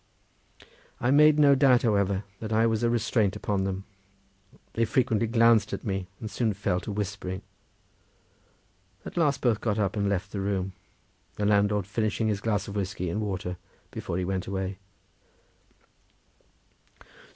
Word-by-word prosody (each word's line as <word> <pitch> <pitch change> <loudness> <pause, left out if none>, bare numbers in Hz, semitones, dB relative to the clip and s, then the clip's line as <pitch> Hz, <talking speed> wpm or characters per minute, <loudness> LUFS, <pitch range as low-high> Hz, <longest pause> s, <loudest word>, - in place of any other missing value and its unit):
I 120 - +1
made 150 +1 +6
no 145 -2 +6
doubt, 130 -2 +4
however, 100 -3 +1 0.2
that 110 0 -6
I 110 +1 +3
was 110 -1 +1
a 120 - +2
restraint 115 -3 +1
upon 100 -2 -1
them; 95 0 -3 0.9
they 115 - +1
frequently 115 -1 +1
glanced 115 -2 +4
at - - -4
me, 95 -4 -3
and 110 -2 -6
soon 110 -5 0
fell 95 -2 0
to 105 - -6
whispering. 100 -2 -4 1.6
At - - -8
last 145 -6 +1
both 115 -4 +1
got 105 -3 0
up 100 -2 0
and 100 -1 0
left 95 -1 -2
the 100 - -3
room; 95 -1 -2 0.6
the 105 - -2
landlord 105 -1 +2
finishing 110 +1 -1
his 100 -2 -1
glass 105 -2 -1
of 100 - -7
whiskey 95 -3 -2
and 105 - -2
water 95 -3 -3 0.3
before 85 - -4
he 90 - -1
went 95 0 -2
away. 95 0 -3
105 Hz, 150 wpm, -27 LUFS, 95-115 Hz, 1.6 s, made